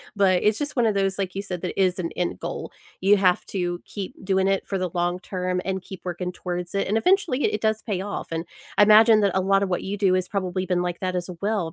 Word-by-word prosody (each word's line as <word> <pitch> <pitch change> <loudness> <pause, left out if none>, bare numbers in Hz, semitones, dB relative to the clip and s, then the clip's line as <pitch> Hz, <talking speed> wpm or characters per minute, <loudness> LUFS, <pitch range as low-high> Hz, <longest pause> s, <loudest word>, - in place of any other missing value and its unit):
But 190 -3 +3
it's 210 0 +2
just 290 0 -3
one 240 -2 +3
of 215 - +2
those, 195 -1 0
like 190 -2 -2
you 195 - -3
said, 180 -4 -5
that 185 +1 -4
is 185 -1 +2
an 170 -2 -3
end 180 - -1
goal. - - -5 0.3
You 200 +2 +5
have 185 -2 +3
to 175 -2 -2
keep 200 -3 -6
doing 190 0 +2
it 195 0 0
for 195 - -1
the 185 -2 -2
long 175 +1 0
term 180 -1 -2
and 190 -1 -2
keep 190 0 -10
working 180 0 -3
towards 180 +1 -5
it, 195 - 0
and 215 +3 +1
eventually 360 - +2
it - - +1
it 215 - -5
does 220 0 +1
pay 195 -5 -3
off. 205 +1 -5
And 165 +1 -3 0.3
I 205 - +7
imagine 215 +1 +7
that 200 -2 +3
a 190 - +3
lotta 195 +1 +3
what 180 - -2
you 200 +2 -3
do 195 -2 +3
has 185 -1 +1
probably 185 -2 -2
been 180 -1 0
like 175 -1 -3
that 185 -1 -2
as 180 +1 -3
well. 200 -6 -1
190 Hz, 265 wpm, -24 LUFS, 180-205 Hz, 0.3 s, I